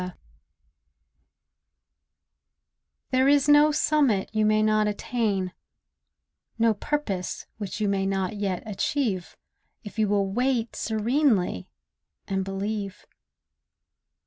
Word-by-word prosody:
ATTAINMENT 180 0 -7 2.9
There 260 +1 +3
is 285 0 +4
no 295 +1 +6
summit 285 -10 +2
you 215 -1 +2
may 215 0 +3
not 215 0 +3
attain, 205 -3 -1 1.0
No 230 -1 +3
purpose 205 -6 -3
which 205 0 -5
you 210 - +1
may 195 -1 0
not 195 +1 -1
yet 195 -3 -2
achieve, 210 -2 -2 0.5
If 210 +1 -8
you 215 - +3
will 200 -1 +2
wait 235 +3 0
serenely 220 - +1 0.6
and 195 -1 -1
believe. 195 +1 -4
215 Hz, 100 wpm, -26 LUFS, 195-245 Hz, 2.9 s, no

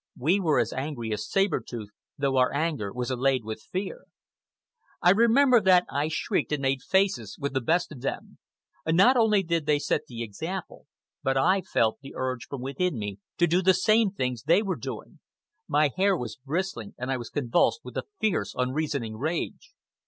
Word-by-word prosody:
We 170 +10 +2
were 160 -6 +2
as - - +1
angry 130 -5 -3
as 105 0 -4
Saber 195 0 +2
Tooth, 110 -4 -8 0.3
though 140 -2 0
our 125 0 +4
anger 145 -9 -1
was 125 +2 -3
allied 130 -1 +1
with 110 0 -6
fear. 205 - -5 0.9
I 180 - +5
remember 235 +4 +5
that 185 -2 +5
I 145 +2 0
shrieked 160 - -1
and 145 -2 -1
made 135 -1 +1
faces 190 - 0
with 140 -1 -3
the 130 - 0
best 165 +8 +1
of 135 -5 -9
them. 135 - -5 0.5
Not 190 +11 +5
only 215 -4 +4
did 165 -3 -1
they 150 -1 +4
set 145 - -1
the 115 -2 -5
example, 160 - -6 0.3
but 135 0 0
I 185 +8 +3
felt 110 -9 0
the 135 - -11
urge 130 -2 -3
from 140 -3 -6
within 140 +4 -1
me 105 -2 -5 0.2
to 175 - +4
do 175 +2 +2
the 190 0 +4
same 215 +3 +3
things 125 - -3
they 170 +8 +3
were 195 -3 -1
doing. - - -8 0.5
My 150 -1 +3
hair 195 0 +3
was 120 -5 -5
bristling, 145 - -4
and 130 +2 -3
I 130 - 0
was 120 -2 -7
convulsed 145 - +1
with - - -10
a - - -3
fierce, 175 - 0
unreasoning 130 -3 -2
rage. 165 - -4
145 Hz, 190 wpm, -27 LUFS, 125-185 Hz, 0.9 s, I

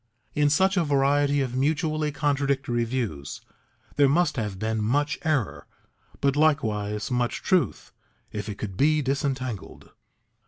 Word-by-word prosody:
In 145 0 +3
such 190 +6 +3
a 175 - +3
variety 145 0 +2
of 125 -2 -2
mutually 155 +2 0
contradictory 140 -4 0
views 110 - -4 0.6
there 140 -1 +5
must 170 +4 +2
have 105 -6 -3
been 110 +1 -1
much 145 +7 0
error, 115 - -1 0.5
but 140 -1 +2
likewise 105 -8 +1
much 125 -1 -1
truth 185 -2 0 0.4
if 105 +1 -5
it 100 - -5
could 100 -3 -5
be 150 +6 +3
disentangled. 130 -5 -3
135 Hz, 130 wpm, -26 LUFS, 110-145 Hz, 0.6 s, there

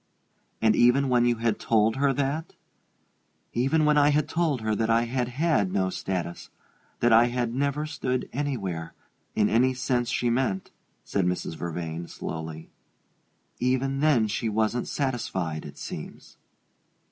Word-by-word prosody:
"And 110 -1 +5
even 130 +3 +4
when 120 -1 +4
you 120 0 +3
had 115 -1 -1
told 110 +1 +2
her 140 0 +3
that 140 +4 -2 0.5
" - - -44 0.3
"Even 135 +6 +2
when 150 0 +4
I 145 0 +5
had 150 0 +2
told 160 -5 0
her 110 0 0
that 110 +1 0
I 115 +1 +4
had 120 +1 -1
had 125 - +1
no 95 -1 0
status 90 -3 -4 0.5
that 120 -1 +4
I 115 +1 +7
had 120 -1 -1
never 140 +3 0
stood 130 -4 -2
anywhere, 100 - -3 0.4
in 105 -1 +3
any 130 +4 +3
sense 125 -1 0
she 120 -1 +1
meant," 115 -6 -1 0.3
said 95 -3 0
Mrs. 90 -2 -2
Vervain, 85 0 -5
slowly 80 0 -7 0.9
"even 130 +2 0
then 140 -7 +4
she 110 +2 -1
wasn't 110 +3 0
satisfied, 95 - -2
it 70 - -12
seems." - - -8
120 Hz, 150 wpm, -26 LUFS, 105-135 Hz, 0.9 s, I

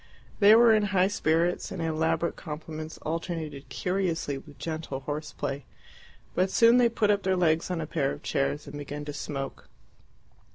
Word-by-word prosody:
They 210 +1 +8
were 230 0 +7
in 215 -1 +3
high 185 +1 +4
spirits, 170 -2 +1
and 190 - -6
elaborate 160 +1 0
compliments 155 0 -7
alternated 155 -4 -4
curiously 175 -2 -1
with 145 +1 -11
gentle 155 -4 -4
horseplay. 145 -1 -4 0.7
But 185 +1 +2
soon 230 +4 +6
they 245 -1 +5
put 215 -2 +2
up 205 -1 +1
their 190 -1 +1
legs 165 -1 +2
on 180 -2 -1
a 160 - -2
pair 150 -2 0
of 70 - -8
chairs 70 +1 -1
and 145 - -8
began 145 +1 -6
to 145 - -5
smoke. 135 -2 -5
160 Hz, 165 wpm, -28 LUFS, 145-185 Hz, 0.7 s, They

